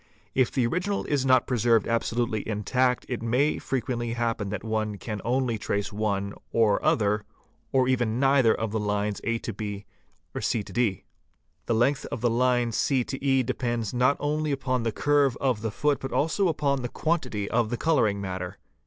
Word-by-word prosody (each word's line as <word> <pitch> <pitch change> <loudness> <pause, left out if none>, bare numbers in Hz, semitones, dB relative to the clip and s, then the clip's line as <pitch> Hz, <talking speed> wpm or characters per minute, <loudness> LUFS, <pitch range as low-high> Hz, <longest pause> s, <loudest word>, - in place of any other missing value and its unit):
If 130 -2 +2
the 130 -3 +1
original 180 +10 -1
s 140 -3 +1
not 130 -2 +4
preserved 115 -3 +2
absolutely 115 -1 0
intact 125 +4 +1
it 125 -3 -3
may 125 +6 +1
frequently 120 -2 -2
happen 115 -4 -1
that 100 -1 -4
one 110 -2 -2
can 105 -1 -5
only 120 -1 0
trace 100 0 -2
one 100 -1 -1 0.2
or 110 -3 +2
other 105 0 +2 0.5
or 130 -1 +3
even 120 -3 +1
neither 135 -4 +4
of 110 -1 -1
the 110 - -1
lines 105 0 -1
A 115 0 0
B,C 105 +1 -5
D. 100 -1 -1 0.6
The 115 - +2
length 130 +5 +1
of 115 - -5
the 120 - +2
line 120 0 +2
C 130 +4 +1
EH 135 -1 +1
depends 120 -3 -2
not 125 +3 +3
only 150 +1 -1
upon 130 -2 -1
the 115 0 -1
curve 145 +1 +2
of 125 -6 0
the 110 - -1
foot 145 +7 0
but 135 - -5
also 165 +6 +1
upon 145 -4 0
the 120 - -3
quantity 125 -12 -1
of 115 -1 +2
the 120 - -2
colouring 115 -11 +2
matter. 90 -2 -5
120 Hz, 170 wpm, -26 LUFS, 110-130 Hz, 0.6 s, not